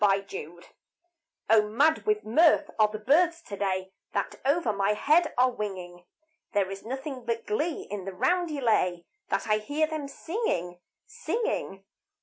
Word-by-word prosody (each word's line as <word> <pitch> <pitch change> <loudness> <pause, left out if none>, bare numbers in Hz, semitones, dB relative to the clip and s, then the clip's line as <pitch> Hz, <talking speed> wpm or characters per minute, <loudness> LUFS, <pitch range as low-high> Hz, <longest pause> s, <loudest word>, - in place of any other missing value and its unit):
NO 195 -1 +4
COMFORT 175 -2 -9 0.8
O 220 0 +6
mad 300 - +2
with 425 0 +2
mirth 310 +5 +4
are 215 - +6
the 215 0 -6
birds 325 +10 +3
to 205 - -7
day 190 -1 -2 0.2
That - - -1
over 280 -4 +2
my 200 +1 +1
head 305 +10 +3
are 255 +1 +4
winging. 185 -5 -6 0.5
There 195 -2 +1
is 195 - -7
nothing 265 +2 -5
but 230 -1 -2
glee 300 +10 -1
in 200 -2 -5
the 195 - -4
roundelay 245 - +1 0.2
That - - -1
I 215 0 +3
hear 290 +8 0
them 310 -2 -4
singing, 275 - -3 0.3
singing. 440 - -3
225 Hz, 150 wpm, -28 LUFS, 195-310 Hz, 0.8 s, O